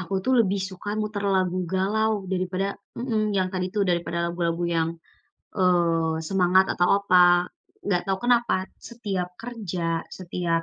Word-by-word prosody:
aku 185 +1 -4
tuh 260 - +2
lebih 200 -1 -1
suka 195 +2 -7
muter 210 -1 -3
lagu 185 -1 0
galau 215 +4 +1 0.2
daripada 185 +1 -1 0.3
mhm, 220 -4 0
yang 185 -1 +1
tadi 185 -1 -1
tuh 205 - +2
daripada 170 0 -1
lagu-lagu 170 0 -1
yang, 165 0 +1 0.7
eee, 170 -4 +2
semangat 190 0 +4
atau 175 0 +2
apa. 180 -2 +5 0.4
Nggak 180 -3 +1
tahu 195 -1 0
kenapa 240 -3 +3 0.3
setiap 200 -7 -3
kerja 180 -8 -3 0.2
setiap, 175 -2 -1
185 Hz, 140 wpm, -25 LUFS, 175-205 Hz, 0.7 s, apa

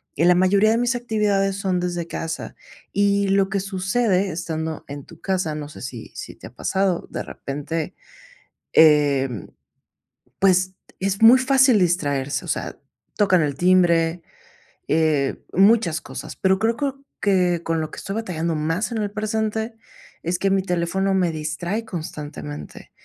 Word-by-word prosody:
y 165 - +2
la 180 0 +6
mayoría 195 +4 +4
de 225 - +2
mis 245 +1 +1
actividades 210 -5 0
son 190 -2 0
desde 175 -1 -2
casa, 165 -1 -5 0.4
y 200 0 +2
lo 195 0 +3
que 200 0 0
sucede 195 +1 0
estando 160 -1 -4
en 145 -1 -8
tu 170 -2 -15
casa, 185 -5 -1
no 150 -1 -6
sé, 150 - -11
si 120 -3 -7
si - - -8
te - - -11
ha - - -16
pasado, 190 -2 -1
de - - -4
repente, 150 +5 -5 0.8
em, 140 - +4 0.9
pues 185 -1 +3 0.3
es 195 +1 -1
muy 230 +3 +9
fácil 260 -3 +4
distraerse, 145 -5 0
o - - -10
sea, - - -3 0.4
tocan 190 -4 +3
el 145 -2 -1
timbre, 175 -1 +3 0.6
eh, 150 -3 +1
muchas 195 -4 +4
cosas. 130 - -8
Pero 190 0 +2
creo 225 +2 +1
creo 275 0 -3 0.2
que 180 -4 +2
con 165 -1 -1
lo 155 - -4
que - - -10
estoy 195 - -5
batallando 170 -7 -2
más 165 +9 -1
en 230 - -2
el 205 -1 -2
presente, 220 +1 -2 0.5
es 175 +1 -1
que 195 - +1
mi 195 0 +3
teléfono 180 +2 0
me 180 -3 +2
distrae 160 +7 -3
constantemente. 145 - -7
180 Hz, 155 wpm, -22 LUFS, 160-200 Hz, 0.9 s, muy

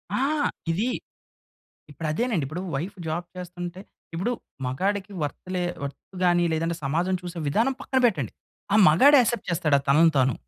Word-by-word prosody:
ఆ! - - +1 0.5
ఇది 210 +9 0 1.0
ఇప్పుడు 160 +3 -6
అదేనండి. 215 - 0
ఇప్పుడు 160 +6 -5
వైఫ్ 185 +8 -4
జాబ్ 170 +3 -2
చేస్తుంటే 175 0 -6 0.3
ఇప్పుడు 190 +9 -1 0.3
మగాడికి 195 +9 -1
వర్త్‌లే 180 +5 -3 0.2
వర్త్ 140 0 -6 0.2
గాని 175 -1 +4
లేదంటే 165 +1 -1
సమాజం 170 +7 0
చూసే 175 -1 -6
విధానం 230 - +2
పక్కన 265 - 0
పెట్టండి. 150 - -1 0.4
ఆ - - +4
మగాడు 270 - +7
యాక్సెప్ట్ 235 -1 0
చేస్తాడా 155 -4 +2
తనను 160 +4 +6
తాను? 130 -2 +3
175 Hz, 145 wpm, -25 LUFS, 155-195 Hz, 1.0 s, మగాడు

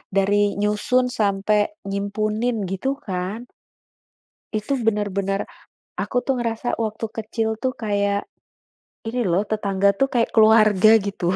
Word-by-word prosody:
dari 205 +1 +2
nyusun 210 +5 +1
sampai 210 +3 +1 0.2
nyimpunin 215 +3 -1
gitu 195 +9 -2
kan? 190 +4 -3 1.1
Itu 215 +5 -1
bener-bener, 200 -2 -1 0.5
aku - - -4
tuh 270 - 0
ngerasa 230 0 -2
waktu 220 0 -2
kecil 220 +1 -2
tuh 255 +1 -2
kayak, 200 -2 -1 0.8
ini 240 +3 -2
lho 180 +3 +2
tetangga 200 -2 +2
tuh 270 - +3
kayak 235 -2 +1
keluarga 215 -2 +6 0.2
gitu, 185 -2 -1
210 Hz, 115 wpm, -22 LUFS, 200-225 Hz, 1.1 s, keluarga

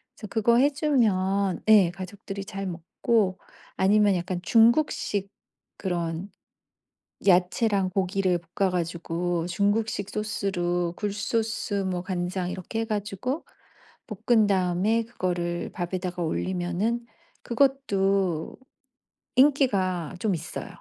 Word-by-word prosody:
그래서 215 - -9
그거 235 +2 +3
해주면 215 - +2
예. 195 -5 +7
가족들이 195 +2 -7
잘 195 +1 -5
먹고 185 +3 0 0.4
아니면 200 0 +4
약간 180 0 -2
중국식 225 -3 +3 0.5
그런 175 0 -3 1.0
야채랑 185 +2 +3
고기를 190 -2 +1 0.2
볶아 195 -2 +2
가지고 170 0 -2
중국식 205 +2 0
소스로 175 -5 -1
굴 205 -1 -2
소스, 220 0 -2
뭐 190 -3 -1
간장 180 0 -2
이렇게 190 +5 -4
해 - - 0
가지고 215 - -3 0.8
볶은 225 -3 +5
다음에 195 +4 +1
그거를 175 -6 -3
밥에다가 180 0 -3
올리면은 185 +8 -1 0.4
그것도 195 - +1 0.8
인기가 200 - +3
좀 210 -4 +1
있어요. 160 - -6
195 Hz, 235 characters per minute, -26 LUFS, 180-220 Hz, 1.0 s, 예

